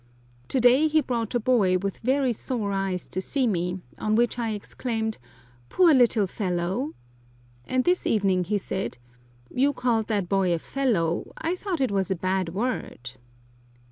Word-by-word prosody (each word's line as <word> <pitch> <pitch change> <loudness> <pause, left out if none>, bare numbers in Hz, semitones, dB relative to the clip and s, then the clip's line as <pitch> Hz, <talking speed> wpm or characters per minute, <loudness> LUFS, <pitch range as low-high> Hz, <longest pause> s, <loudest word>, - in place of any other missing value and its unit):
To 265 - 0
day 250 +5 +5
he 310 0 +3
brought 240 -4 -2
a - - +3
boy 210 -6 +3
with 195 +1 -4
very 260 +1 +1
sore 220 -3 -3
eyes 195 -2 -2
to 185 - -4
see 265 +6 0
me, 180 -3 -1 0.2
on 215 0 +1
which 240 +1 +1
I 230 -1 -1
exclaimed, 220 +1 -3 0.5
"Poor 350 -4 +5
little 240 -5 +4
fellow!" 190 - -2 0.7
and 255 0 +1
this 360 +4 +1
evening 190 -4 +2
he 205 +4 0
said, 190 -4 -4 0.6
"You 280 +3 +2
called 235 -4 0
that 205 -5 -1
boy 190 -2 +2
a - - -1
fellow, 180 -7 -1
I 330 +3 -1
thought 365 -5 -3
it 260 - +1
was 195 -2 0
a 190 - +1
bad 185 0 -1
word!" 190 - -3
220 Hz, 165 wpm, -25 LUFS, 190-255 Hz, 0.7 s, day